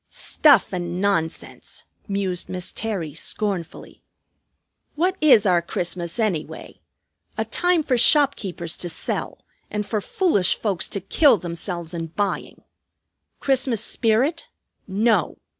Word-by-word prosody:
"Stuff 280 -11 +3
and 175 -1 -3
nonsense!" 190 -5 -2 0.2
mused 195 -3 -2
Miss 180 -1 -5
Terry 190 -9 -4
scornfully. 190 +1 -4 0.9
"What 360 +5 +1
is 270 -9 +6
our 180 -3 +3
Christmas, 170 0 -4
anyway? 195 -9 -3 0.6
A - - -1
time 355 -2 +1
for 255 -4 +1
shopkeepers 215 - +2
to 175 - -3
sell - - -5 0.2
and 210 0 -3
for 215 0 -2
foolish 205 - +2
folks 195 -5 0
to 200 - -4
kill 265 - +4
themselves 170 -1 -5
in 165 -1 -4
buying. 200 +5 -3 0.8
Christmas 260 -5 +1
spirit? 250 +9 +1 0.4
No! 205 -2 +1
200 Hz, 115 wpm, -22 LUFS, 175-235 Hz, 0.9 s, is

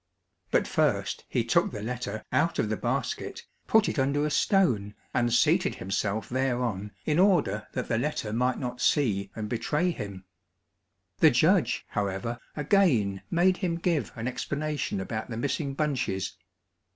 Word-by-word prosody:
But - - +2
first - - 0
he - - +1
took - - +3
the 105 - -6
letter 115 -3 -4
out 170 - +2
of 105 - 0
the 110 - 0
basket, - - -3 0.2
put 220 -1 +4
it - - -1
under 140 +2 +1
a 150 - -1
stone 125 - +2 0.2
and 120 -1 +1
seated - - +3
himself 100 +2 -2
thereon 120 -6 -1
in 155 +1 +2
order 170 - +3
that - - -3
the 115 - +1
letter 120 -6 -2
might 125 +2 +1
not 125 -1 -4
see 100 -10 +2
and 110 -1 -4
betray 150 +10 0
him. 100 - -7 0.9
The - - +8
judge, - - +3
however, 105 +4 -2 0.2
again 140 - +2
made 180 +2 +3
him 175 -4 -1
give 165 - 0
an 115 +1 -4
explanation 145 -2 -2
about 110 +4 -4
the 115 - -4
missing 140 +2 -2
bunches. 135 -11 -1
125 Hz, 150 wpm, -28 LUFS, 105-150 Hz, 0.9 s, The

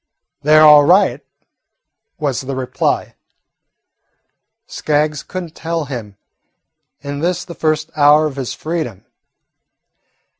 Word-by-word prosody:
"They 155 +2 +4
're 155 - +7
all 150 -1 +8
right," 185 +7 +3 0.9
was 145 -5 -2
the 135 0 -5
reply. 130 -1 -2 1.5
Skaggs 150 -1 -1
could 185 0 -6
n't 165 -2 -13
tell 165 -1 -3
him, 115 -7 -8 0.8
in 140 0 -6
this 180 +2 -2
the 170 - -9
first 155 -1 -2
hour 150 +1 +5
of 150 -3 -4
his 130 -3 -4
freedom. 155 - -5
150 Hz, 115 wpm, -17 LUFS, 140-160 Hz, 1.5 s, all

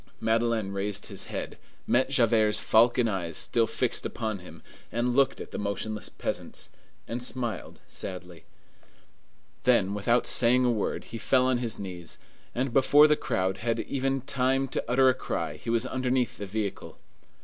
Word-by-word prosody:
Madeleine 115 -2 +1
raised 100 +1 -3
his - - -3
head, - - -6 0.3
met 130 +2 +2
Javert's 115 -5 +3
falcon 120 +2 +4
eye 95 -6 -2
still 115 +7 +1
fixed 120 +1 0
upon 110 -4 -3
him, 85 -3 -13 0.3
looked 125 +3 +2
at - - -8
the - - -4
motionless 105 +1 -3
peasants, - - -5 0.4
and 120 +2 -4
smiled 125 -2 -4
sadly. 90 -2 -7 1.2
Then, 120 -7 +3
without 115 +4 +2
saying 125 +1 +3
a 125 - +3
word, 110 -3 -2
he 115 - -8
fell 130 +3 +3
on 130 -1 +2
his 120 -3 -3
knees, 90 -4 -7 0.4
and 125 0 -1
before 145 +3 +6
the 150 - +4
crowd 95 -7 -1
had 115 +1 -1
even 135 0 -1
had 135 - -27
time 135 +1 +1
to - - -2
utter 130 +2 +4
a 130 - +6
cry, - - -4
he - - -7
was 115 +1 +1
underneath 130 -1 0
the 100 - -5
vehicle. 105 0 -4
115 Hz, 160 wpm, -28 LUFS, 105-125 Hz, 1.2 s, before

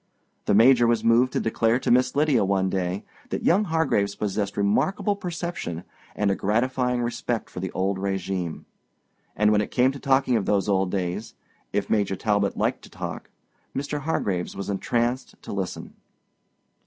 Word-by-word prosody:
The - - +3
Major 120 +2 +6
was 115 -1 +2
moved 120 +3 +4
to - - +1
declare 115 +1 +1
to - - -1
Miss 125 +2 +3
Lydia 145 -6 +3
one 95 -1 +1
day 95 +1 -2 0.3
that - - -3
young 200 +5 +4
Hargraves 160 - +1
possessed 100 -1 -2
remarkable 190 - +1
perception 170 - -4 0.3
and 105 -1 +1
a - - +1
gratifying 125 +4 0
respect 120 -1 -3
for - - -6
the 95 +1 -4
old 95 +1 0
régime. 95 -3 -3 0.7
And 105 0 +3
when 105 -1 +4
it - - -3
came 130 +1 +3
to 140 - -8
talking 135 -3 +2
of 100 - -2
those 100 -2 +2
old 95 -2 +2
days—if 90 +3 -4
Major 100 -3 +1
Talbot 100 -1 0
liked - - 0
to - - -14
talk, - - -6 0.5
Mr. 145 +2 -2
Hargraves 100 - -2
was 100 +1 -4
entranced 120 +5 -1
to - - -6
listen. 95 -2 -4
105 Hz, 165 wpm, -25 LUFS, 95-130 Hz, 0.7 s, Major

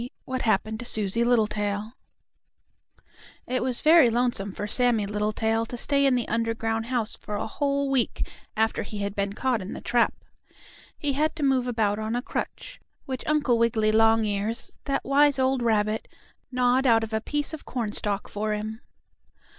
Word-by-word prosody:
III 245 - -6
WHAT 260 0 -3
HAPPENED 220 -1 0
TO 245 - -6
SUSIE 220 0 0
LITTLETAIL 215 -2 0 1.5
It 255 0 -1
was 250 -1 -2
very 315 -5 +6
lonesome 235 -4 0
for 205 - -5
Sammie 235 -1 +2
Littletail 215 +2 -1
to 245 - -6
stay 280 +2 +2
in 265 - +3
the 245 -2 -1
underground 225 0 -1
house 235 -3 0
for 210 - -7
a - - -2
whole 280 +3 -1
week 265 -4 0 0.3
after 220 0 +1
he 210 - -6
had 200 0 -3
been 200 0 -1
caught 250 0 0
in 185 - -6
the - - -6
trap. 240 -1 +2 0.8
He 290 -2 -1
had 305 +4 0
to 310 - -4
move 260 -2 +2
about 215 -4 0
on 220 +2 -2
a 245 - -2
crutch, - - -5 0.3
which 260 -2 -5
Uncle 290 -6 +2
Wiggily 225 -2 +2
Longears, 225 0 +1
that 275 - -1
wise 285 +1 +4
old 260 -1 +1
rabbit, 215 -2 +1 0.4
gnawed 250 +1 +2
out 225 -2 +4
of 220 0 -6
a 220 - 0
piece 295 +5 -1
of 315 - -7
cornstalk 210 -4 -2
for 215 +1 -2
him. 215 +2 -5
230 Hz, 170 wpm, -26 LUFS, 215-260 Hz, 1.5 s, very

